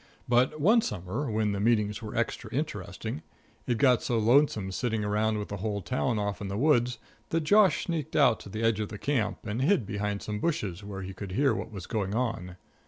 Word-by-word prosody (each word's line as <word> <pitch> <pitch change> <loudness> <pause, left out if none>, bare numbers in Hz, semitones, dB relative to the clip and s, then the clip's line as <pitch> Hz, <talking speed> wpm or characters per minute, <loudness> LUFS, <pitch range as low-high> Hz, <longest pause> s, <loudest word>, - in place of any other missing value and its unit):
But 125 +5 +2
one 215 +10 +5
summer 105 - -3
when 110 -1 +1
the 100 - -2
meetings 105 -1 +1
were 110 -2 -7
extra - - -2
interesting, 75 - -4 0.5
it 120 - +1
got 125 -1 +4
so 120 - 0
lonesome 115 -4 +3
sitting 110 +1 -1
around 105 +1 +1
with 105 - -4
the 100 - -4
whole 100 0 -3
town 125 0 0
off 100 -1 -2
in 100 - -3
the 100 +1 -3
woods 125 -2 +3 0.3
that 165 - +1
Josh 205 +4 +4
sneaked 160 -3 -3
out 115 -3 +5
to - - -10
the 110 +3 -4
edge 115 -2 +2
of 105 - -2
the 105 - -7
camp 120 -3 -1
and 110 +3 -2
hid 155 - +3
behind 105 -1 -3
some 105 -1 -3
bushes 105 - -2
where 100 -1 -6
he 95 +1 -6
could 95 0 -7
hear 135 +5 +3
what - - -5
was 95 -5 -7
going 105 -3 -2
on. 115 -8 -2
110 Hz, 215 wpm, -28 LUFS, 100-125 Hz, 0.5 s, one